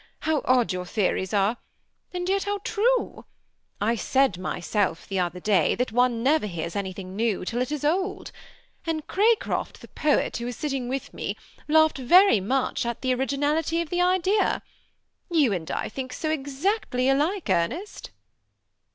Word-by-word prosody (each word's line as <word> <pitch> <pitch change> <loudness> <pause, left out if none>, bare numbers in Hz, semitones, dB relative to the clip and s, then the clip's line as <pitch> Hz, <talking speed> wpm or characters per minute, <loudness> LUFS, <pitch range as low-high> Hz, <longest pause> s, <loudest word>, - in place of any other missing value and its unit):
How 315 -2 +1
odd 250 -5 +3
your 180 0 -4
theories 190 -1 0
are, 205 +3 +2 0.5
and 360 0 -3
yet 390 +1 +1
how 410 0 -1
true! 480 +4 0 0.5
I 215 +3 +2
said 260 -5 +1
myself, 185 0 -1
the 195 -1 -2
other 180 0 -1
day, 190 -4 +2
that 250 -1 -1
one 245 0 +2
never 285 -3 +3
hears 170 -2 -5
anything 190 -1 -5
new 220 -4 0
till 240 +5 -2
it 255 - -2
is 295 -1 -3
old; 375 +5 -1 0.6
and 315 -2 -2
Cracroft 435 +3 +1
the - - -12
poet, 300 -1 0
who 235 - -5
was 245 0 -4
sitting 270 -4 -3
with 270 +1 -4
me, - - -4 0.3
laughed 315 -2 +4
very 355 - +6
much 255 +8 0
at 235 -1 -4
the 255 -1 +1
originality 290 +5 0
of 335 -3 -3
the 355 0 +1
idea. 370 +3 +2 0.7
You 300 - +3
and 165 -4 -4
I - - -2
think 255 +1 -6
so 310 +3 -2
exactly 280 - -1
alike, 305 +8 +1
Ernest." 295 - -1
265 Hz, 160 wpm, -25 LUFS, 210-325 Hz, 0.7 s, very